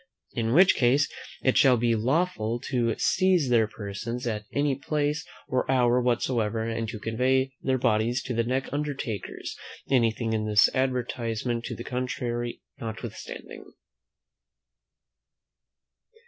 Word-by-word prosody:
In 115 -1 0
which 185 +3 +7
case 135 +4 +3 0.4
it 130 - +4
shall 130 -3 +6
be 115 0 +2
lawful 120 -2 0
to 120 -4 +1
seize 185 -7 +3
their 115 -3 +4
persons 110 +4 -5
at 105 -3 -2
any 145 0 +1
place 145 +2 -1 0.2
or 130 - -1
hour 125 -1 +3
whatsoever, 115 -2 0
and 115 0 -2
to 115 - -5
convey 130 +4 +1
their 130 0 +1
bodies 115 +2 +1
to 125 - -3
the 115 0 +1
next 130 +4 -2
undertaker's; 140 -8 -4 0.4
anything 115 -3 +2
in 110 -1 -1
this 105 -1 +5
advertisement 120 -2 -1
to 120 - -4
the 120 - -7
contrary 120 -1 -3 0.2
notwithstanding. 110 -3 -7
120 Hz, 125 wpm, -27 LUFS, 115-130 Hz, 0.4 s, which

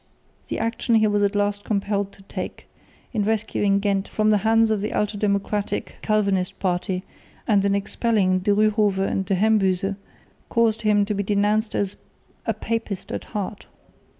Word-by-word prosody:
The - - -3
action 230 +1 0
he 220 -1 +5
was 205 -1 +2
at 200 0 +1
last 205 0 0
compelled 200 -1 -1
to 195 - -16
take, - - -6 0.5
in 215 -3 +1
rescuing 205 -2 +1
Ghent 200 -1 0
from 215 0 +1
the 210 - +4
hands 225 +2 +3
of 210 -2 0
the 210 - -3
ultra 210 0 -1
democratic 200 0 -1
Calvinist 200 -3 +1
party 185 0 -1 0.4
and 205 -3 +3
in 200 0 +2
expelling 200 -2 +1
De 185 - -2
Ryhove 210 -1 +3
and 195 - -1
De 190 +1 0
Hembyze, 195 -2 +2 0.6
caused 230 -1 +2
him 210 -2 +3
to 210 - -2
be 200 - -1
denounced 210 +2 +1
as 200 -1 -1 0.5
"a 225 - +2
papist 220 -3 -3
at - - -4
heart." 205 -1 -5
205 Hz, 165 wpm, -23 LUFS, 195-215 Hz, 0.6 s, he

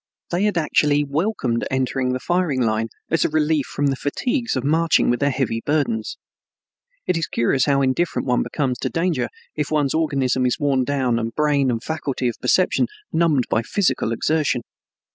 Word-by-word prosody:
They 180 +4 +1
had 210 -4 0
actually 150 -2 +2
welcomed 140 - -1
entering 130 0 0
the 130 - -2
firing 175 -5 0
line, 110 0 0 0.2
as 165 - +3
a - - +1
relief 155 -2 +1
from 145 - -2
the 135 -1 +2
fatigues 235 - -1
of 130 - -1
marching 160 -1 +3
with 120 - 0
their 140 - +2
heavy 125 -4 -1
burdens. 140 -8 -1 0.9
It 180 - +1
is 165 - -1
curious 125 +3 +1
how 140 -1 +2
indifferent 135 +6 0
one 125 -1 +2
becomes 130 -5 -2
to - - -2
danger 165 -8 0 0.3
if 150 -1 -2
one's 145 -3 +1
organism 135 -5 +1
is 125 - -1
worn 135 -3 +1
down 130 -4 0
and 115 0 -4
brain 145 -3 +2
and 115 -2 -2
faculty 145 -5 -2
of 120 - -3
perception - - +2 0.3
numbed 160 -6 +2
by 110 - +1
physical 175 - 0
exertion. 155 +6 0
140 Hz, 180 wpm, -21 LUFS, 125-155 Hz, 0.9 s, as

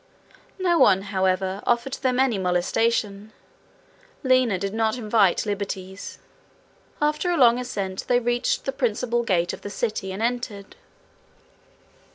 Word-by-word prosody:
No 355 -3 +2
one, 190 +1 +5
however, 190 +1 0
offered 240 +2 0
them 255 -2 +1
any 255 -6 +2
molestation: 200 +3 0 0.9
Lina 255 -6 +3
did 195 +2 -4
not 225 +1 0
invite 215 -5 +2
liberties. 195 -2 -5 0.8
After 300 +4 0
a 350 - +1
long 240 -2 +5
ascent, 195 -6 -4
they 245 -1 +3
reached 240 0 -1
the 270 - 0
principal 240 -2 -1
gate 180 -6 0
of - - -8
the 205 - -6
city 205 -3 -3
and 195 +4 -4
entered. 235 -4 -3
220 Hz, 130 wpm, -24 LUFS, 195-250 Hz, 0.9 s, one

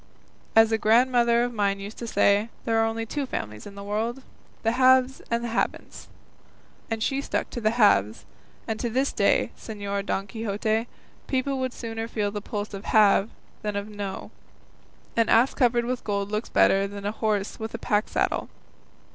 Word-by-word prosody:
As 225 0 +6
a 225 - +1
grandmother 235 +1 +4
of 245 0 -2
mine 200 -2 0
used 200 +2 -8
to 235 - -5
say, 205 0 +3 0.2
there 225 -1 +2
are 225 - +3
only 225 0 -3
two 280 +4 -3
families 105 - -5
in 200 - -11
the 200 - -8
world, 225 +6 -2 0.4
the 225 - +2
Haves 260 +1 +4
and 235 0 0
the 240 - -3
Haven'ts; 230 - -3 0.8
and 225 -1 -2
she 275 +3 0
stuck - - -3
to 240 - -5
the 215 - +3
Haves; 110 - +3 0.4
and 220 -1 -2
to 240 - -1
this 265 +4 0
day, - - +2
Señor 200 -2 -4
Don 195 - -1
Quixote, 220 +2 -2 0.4
people 265 0 -1
would 260 -1 -1
sooner 225 -2 -5
feel 210 -3 -2
the 205 0 -4
pulse 205 0 -5
of 195 +1 -7
'Have,' 210 -1 +4 0.3
than 210 -1 -3
of 200 +1 -3
'Know;' 200 -2 -6 0.8
an 230 -1 +2
ass 235 +4 +4
covered 240 -2 +2
with 250 0 -3
gold 200 -1 -2
looks 215 +2 -2
better 195 +1 +4
than 200 0 -8
a 205 - 0
horse 215 -2 -2
with 220 +1 -5
a - - -3
pack 210 -1 0
saddle. - - -1
220 Hz, 185 wpm, -25 LUFS, 205-235 Hz, 0.8 s, As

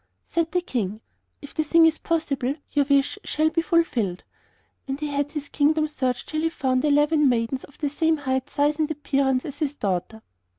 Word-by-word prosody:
Said 335 -1 -1
the 360 - +1
King: 215 - -3 0.4
'If 285 - -10
the 315 - 0
thing 330 +2 +5
is 320 -1 +2
possible 285 -5 -1 0.2
your 285 -1 +2
wish 280 +7 +2
shall 315 +1 +1
be 330 +1 +1
fulfilled'; 245 - 0 0.6
and 270 +1 -3
he 300 - -3
had 285 0 -2
his 295 -2 -4
kingdom 305 +2 +2
searched 260 -4 -2
till 310 0 -1
he 325 - +1
found 260 -5 0
eleven 295 0 +4
maidens 240 +2 0
of 285 - -21
the 295 - -1
same 320 +1 +2
height, 265 -1 -2
size, 295 +2 +1
and 310 0 +1
appearance 275 -3 0
as 285 -2 -6
his 290 -2 -2
daughter. 200 +3 -2
290 Hz, 195 wpm, -24 LUFS, 260-315 Hz, 0.6 s, thing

